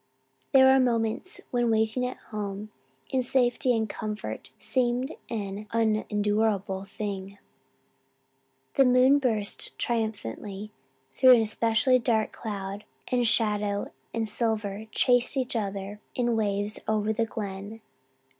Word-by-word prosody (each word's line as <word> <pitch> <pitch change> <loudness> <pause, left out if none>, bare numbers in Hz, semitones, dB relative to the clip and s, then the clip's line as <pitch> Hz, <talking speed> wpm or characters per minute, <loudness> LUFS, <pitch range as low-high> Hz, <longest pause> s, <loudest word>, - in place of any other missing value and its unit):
There 265 -1 +7
were 265 0 +6
moments 235 +6 0
when 240 -1 +1
waiting 220 +3 +1
at 255 - -6 0.2
home, 205 0 -4 0.4
in 260 - +2
safety 245 -1 +2
and 220 -1 0
comfort, 215 +1 -5
seemed 255 +2 0 0.2
an 205 -1 -4
unendurable 210 -3 +1
thing. 200 -1 -5 1.4
The 270 - +7
moon 255 +3 +5
burst 220 -6 -2
triumphantly 210 - -3 0.4
through 255 - +7
an 230 - +3
especially 230 +4 +3
dark 225 -3 +1
cloud 200 -2 -5 0.3
and 245 -2 +2
shadow 210 -2 +1 0.2
and 225 -1 -1
silver 215 -1 -2
chased 245 +3 +2
each 255 -2 -1
other 200 -1 -3 0.2
in 240 -2 +1
waves 205 -1 0
over 215 0 +1
the 225 +1 0
Glen. 205 0 -6
220 Hz, 115 wpm, -27 LUFS, 205-245 Hz, 1.4 s, There